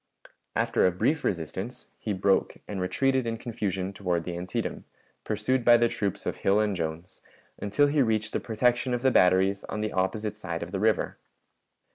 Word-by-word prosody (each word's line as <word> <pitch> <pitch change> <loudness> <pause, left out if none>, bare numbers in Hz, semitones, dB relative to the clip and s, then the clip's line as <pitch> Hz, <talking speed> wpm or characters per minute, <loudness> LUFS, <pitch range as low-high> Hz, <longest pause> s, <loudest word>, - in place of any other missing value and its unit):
After - - +3
a - - +2
brief 150 - 0
resistance, 95 +7 -4
he 110 - -3
broke 95 0 +1
and 100 -3 -4
retreated 130 +6 +1
in 115 0 -2
confusion 100 -5 -3
toward 90 -4 -1
the 90 0 -5
Antietam, 90 +1 -4 0.4
pursued 115 +4 0
by 120 0 +7
the 120 0 +3
troops 100 -4 -3
of - - -2
Hill 100 +2 +2
and 105 -2 +1
Jones, 85 +1 -5 0.4
until 105 +8 +2
he 145 0 +2
reached 110 -3 0
the - - +1
protection 125 +2 +1
of 120 - -4
the 130 - +4
batteries 95 0 +4
on 105 - -4
the 110 - -2
opposite 105 +3 -1
side 90 -5 -4
of 85 - -8
the 95 - -2
river. 110 -2 +1
105 Hz, 180 wpm, -27 LUFS, 95-120 Hz, 0.4 s, by